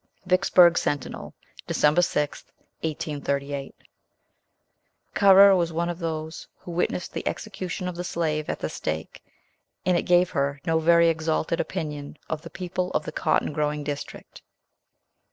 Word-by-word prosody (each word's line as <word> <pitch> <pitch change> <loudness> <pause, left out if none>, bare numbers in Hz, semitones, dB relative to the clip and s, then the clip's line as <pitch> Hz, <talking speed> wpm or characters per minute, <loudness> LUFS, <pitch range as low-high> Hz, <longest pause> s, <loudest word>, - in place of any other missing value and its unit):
Vicksburg 180 -2 +5
Sentinel, 145 -3 -4 0.3
Dec. - - -2 0.2
6th, 150 -4 0 0.3
1838. 145 -3 -3 1.4
Currer 195 0 +7
was 170 -2 0
one 170 +2 -1
of 175 0 -5
those 160 -1 -5
who 175 - -10
witnessed 175 +1 -2
the - - -4
execution 185 -4 -4
of 180 - -4
the 175 - -4
slave 155 -3 -2
at - - -1
the - - -1
stake, 80 +1 -5 0.6
and 180 0 +3
it 175 - +2
gave 180 0 +3
her 140 0 -1
no 160 0 +2
very 170 +1 +5
exalted 160 0 0
opinion 150 -4 -4
of 160 -1 -2
the - - -10
people 180 0 -3
of - - 0
the - - -5
cotton 150 - 0
growing 150 0 -1
district. 145 -1 -7
165 Hz, 140 wpm, -25 LUFS, 150-180 Hz, 1.4 s, Currer